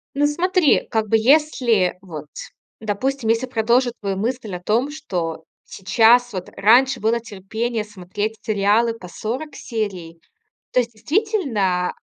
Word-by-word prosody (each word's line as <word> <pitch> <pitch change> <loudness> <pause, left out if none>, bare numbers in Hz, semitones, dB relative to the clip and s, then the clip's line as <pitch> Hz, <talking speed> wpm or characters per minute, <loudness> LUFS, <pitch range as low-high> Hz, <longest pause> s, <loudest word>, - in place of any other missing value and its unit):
Ну 290 +1 +3
смотри, 350 +1 +2
как 220 -1 0
бы 225 - +3
если 235 - +3
вот, 155 -6 -9 0.5
допустим, 225 +3 -2
если 230 +3 +1
продолжу 240 +1 +2
твою 200 -2 -2
мысль 230 0 -3
о 175 - -7
том, 235 +9 0
что 175 - -4 0.2
сейчас 230 +4 +3
вот 185 -2 -5
раньше 245 +6 +4
было 225 +2 +1
терпение 220 +2 -4
смотреть 205 +1 -5
сериалы 215 +2 +2
по 205 -5 -11
40 245 - -5
серий. 190 -8 -5 0.5
То - - +3
есть, 235 -1 -2
действительно, 230 - 0
225 Hz, 135 wpm, -21 LUFS, 195-255 Hz, 0.5 s, раньше